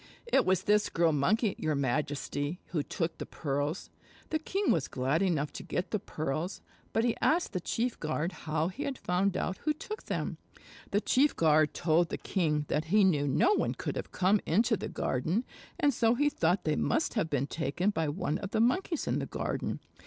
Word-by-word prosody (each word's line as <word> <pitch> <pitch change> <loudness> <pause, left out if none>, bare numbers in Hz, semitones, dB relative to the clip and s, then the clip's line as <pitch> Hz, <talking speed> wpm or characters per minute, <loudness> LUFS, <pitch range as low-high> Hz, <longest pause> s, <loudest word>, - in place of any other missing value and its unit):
"It 470 - +2
was 185 -1 +3
this 210 0 +3
Girl 165 -1 +3
Monkey, 195 - +2
your 155 -1 0
Majesty, 145 +3 -1
who 160 - 0
took 165 +3 -3
the - - -4
pearls." 145 +3 -3 0.4
The 315 - +1
king 390 +6 0
was 160 -5 +1
glad 135 +6 0
enough 160 -6 0
to - - -6
get 180 - -3
the 215 - 0
pearls, 155 +3 -3 0.3
but 225 - +1
he 240 -1 +2
asked 335 -3 +2
the 185 - 0
chief 235 +7 -2
guard 155 +2 -1
how 160 0 -2
he 220 +10 -8
had 275 -3 -2
found 185 +2 0
out 185 - -2
who 305 - 0
took 425 +8 -7
them. - - -3 0.5
The 205 - +1
chief 280 +6 +3
guard 155 -1 +3
told 165 +1 +2
the - - -3
king 150 -6 0
that 150 +1 0
he 205 +6 +4
knew 150 -7 +3
no 365 - +4
one - - 0
could - - -4
have - - -5
come 195 +3 +3
into 220 +7 +3
the - - -5
garden 165 - -1 0.3
and 290 -4 +3
so 230 0 +3
he 290 +4 +3
thought 175 - +1
they 155 -1 +1
must 315 - +1
have 205 -9 0
been 140 -3 0
taken 165 +6 -1
by 160 -6 -1
one 145 +1 -2
of 195 - -5
the 220 - 0
Monkeys 320 - +1
in - - 0
the - - -3
garden. - - -3
175 Hz, 205 wpm, -30 LUFS, 150-225 Hz, 0.5 s, he